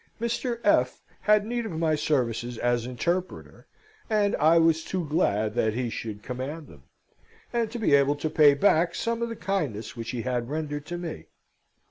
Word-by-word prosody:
Mr. 235 +1 -2
F. 125 -11 +2 0.2
had 210 -1 +4
need 240 +1 -2
of 220 - -5
my 160 -1 +1
services 125 -6 -1
as 120 0 0
interpreter, 175 +9 -3 0.4
and 210 -2 +2
I 160 +3 +5
was 165 -1 +3
too 180 -3 -3
glad 110 - +1
that 110 -1 0
he 120 -1 -2
should 105 -3 -6
command 135 +5 -5
them, 70 -3 -16 0.7
and 235 -2 0
to 240 - -6
be 220 -10 +1
able 140 +1 +4
to 145 +2 -3
pay 145 -2 +6
back 170 +1 +3
some 230 0 -2
of 235 - -1
the 230 - -5
kindness 155 - -3
which 115 -1 -6
he 120 -3 -3
had 125 -1 -2
rendered 150 -1 -4
to 175 - -4
me. 165 - -6
155 Hz, 180 wpm, -26 LUFS, 125-190 Hz, 0.7 s, pay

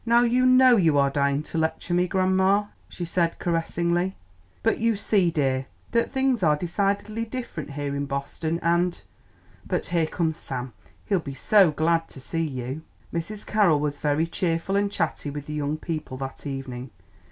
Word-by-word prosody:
"Now 235 +1 +4
you 250 +2 +3
know 255 -1 +7
you 160 -6 +4
are 140 -1 +3
dying 140 +1 +1
to 165 - -3
lecture 160 +2 -1
me, 180 +1 +3
grandma," 190 +2 +3 0.3
she 175 - -5
said 170 0 0
caressingly; 170 +2 0 0.5
"but 225 - +2
you 230 0 +2
see, 200 -3 +2
dear, 135 -4 0 0.2
that 235 0 +1
things 265 -4 +1
are 155 -4 +4
decidedly 200 +6 -1
different 225 - -6
here 145 -1 -3
in 140 0 -2
Boston, 150 +4 -3
and 175 +1 +2 0.7
But - - -1
here 170 -2 +1
comes 160 -1 -1
Sam; 130 -4 -5 0.3
he'll 195 -3 +2
be 140 -4 -7
so 195 +6 +5
glad 165 +2 +1
to - - -11
see 165 +5 -3
you." 135 -1 -4 0.3
Mrs. 200 +6 -4
Carroll 200 -8 +3
was 145 -1 -2
very 150 +2 +1
cheerful 170 +2 -1
and 200 0 +1
chatty 150 - -2
with 145 0 -6
the 150 - -6
young 150 0 -1
people 155 -5 -5
that 135 +2 -6
evening. 135 -2 -5
165 Hz, 175 wpm, -25 LUFS, 145-195 Hz, 0.7 s, know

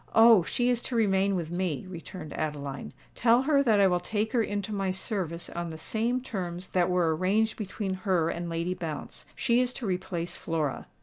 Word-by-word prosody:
"Oh! 225 -3 +8
she 245 +8 +1
is 240 -1 +1
to 250 - -3
remain 200 -3 +3
with 170 -3 -3
me," 175 -5 -2
returned 175 -2 -8
Adeline. 145 -3 -4 0.2
"Tell 240 +2 +4
her 285 0 +4
that 225 -6 +4
I 200 - +6
will 180 -2 +3
take 215 +5 -2
her 240 - +3
into 205 -1 -2
my 195 -2 -1
service 185 -3 -3
on 170 0 -4
the 160 - -7
same 230 +9 0
terms 180 -7 -5
that 180 -1 +2
were 175 -3 +2
arranged 210 +6 +1
between 200 -2 -3
her 185 -5 +2
and 170 0 -4
Lady 170 +2 -1
Bounce. 160 -4 -6
She 240 +1 +3
is 250 0 0
to 245 - -6
replace 180 -2 -2
Flora." 155 -4 -2
190 Hz, 195 wpm, -28 LUFS, 170-220 Hz, 0.2 s, Oh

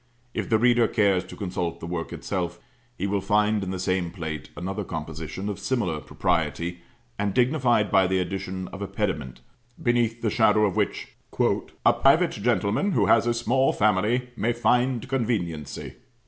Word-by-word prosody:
If - - -3
the 110 - +4
reader 120 0 +4
cares 100 -5 +2
to - - -10
consult 90 -4 -3
the - - -7
work 85 -1 -4
itself, 85 -1 -3 0.4
he - - -2
will 100 0 0
find 105 +2 +2
in 95 - -4
the 95 - -3
same 90 -1 0
plate 80 -5 -6
another 95 +4 -3
composition 80 +2 -5
of 100 -1 -4
similar 100 -7 -1
propriety, 85 +4 -1 0.4
and 100 -2 -1
dignified 120 -5 +2
by 95 -1 +5
the 95 +1 +1
addition 95 0 -3
of 95 - -9
a 100 - -2
pediment, 65 -8 -3 0.4
beneath 120 -1 +1
the 110 - +1
shadow 110 -1 +4
of 95 - -1
which - - -1 0.8
"a - - +7
private 160 +6 +4
gentleman 115 - 0
who - - +3
has 115 +1 +4
a 120 - +3
small 125 +3 +2
family 110 +5 +1
may 115 +1 0
find 125 +1 +1
conveniency." 100 - -3
100 Hz, 165 wpm, -25 LUFS, 90-120 Hz, 0.8 s, a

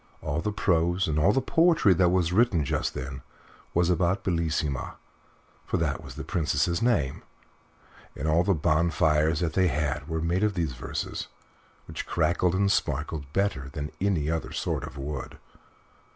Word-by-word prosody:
All 70 +3 -1
the 105 - -1
prose 85 -1 +1
and 75 -1 0 0.2
the 135 - +3
poetry 160 - +4
that 90 0 +3
was 90 -1 +1
written 100 -8 +3
just - - -1
then 65 +1 -5 0.5
was 85 +1 +3
about 90 +3 +1
Bellissima 80 -6 -1 0.7
for - - 0
that - - -1
was - - -10
the - - -6
Princess's 85 +1 0
name 95 - +1 0.9
and 75 - -3
all 80 +3 +3
the 95 0 +2
bonfires 80 -1 +2
that 80 -2 -1
they 95 0 +3
had 75 -4 -1
were 80 -1 -2
made 85 +5 0
of 105 -2 +1
these 80 -7 -1
verses, 60 - -4 0.6
which - - -6
crackled 85 +2 +1
and 100 +1 +2
sparkled 75 -4 -2
better 75 -8 -1
than 75 0 -4
any 95 -7 +1
other 80 0 -2
sort - - -2
of 70 - -10
wood. 70 -1 -5
85 Hz, 160 wpm, -27 LUFS, 75-95 Hz, 0.9 s, poetry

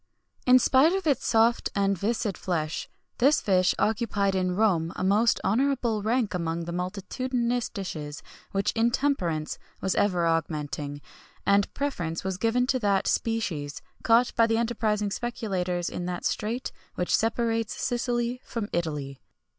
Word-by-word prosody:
In 250 0 +8
spite 265 +6 +4
of 385 -2 -2
its 285 -6 +1
soft 230 +1 +3
and 200 -1 +2
viscid 215 +1 -1
flesh, 160 -4 -3 0.3
this 275 +5 +5
fish 185 -2 +2
occupied 205 -3 +1
in 185 -1 0
Rome 180 -6 +2
a - - -3
most 210 +5 +3
honourable 235 0 +1
rank 225 0 0
among 170 -1 -2
the 170 - -5
multitudinous 235 +7 -2
dishes 155 -8 -6 0.3
which 195 0 +1
intemperance 225 - 0 0.2
was 190 - 0
ever 180 -4 +2
augmenting, 150 -3 -2 0.4
and 200 0 +3
preference 175 - -2
was 190 -1 -3
given 235 +2 +2
to 255 0 +1
that 200 -4 +1
species 175 -11 -1 0.2
caught 235 +2 +4
by 230 - +5
enterprising 225 -2 0
speculators 185 -7 -2
in 175 - -4
that 180 -1 -4
strait 230 +4 -2 0.2
which 180 - +1
separates 225 0 0
Sicily 240 0 -1
from 220 -3 -4
Italy. 150 -5 -3
205 Hz, 140 wpm, -27 LUFS, 180-235 Hz, 0.4 s, In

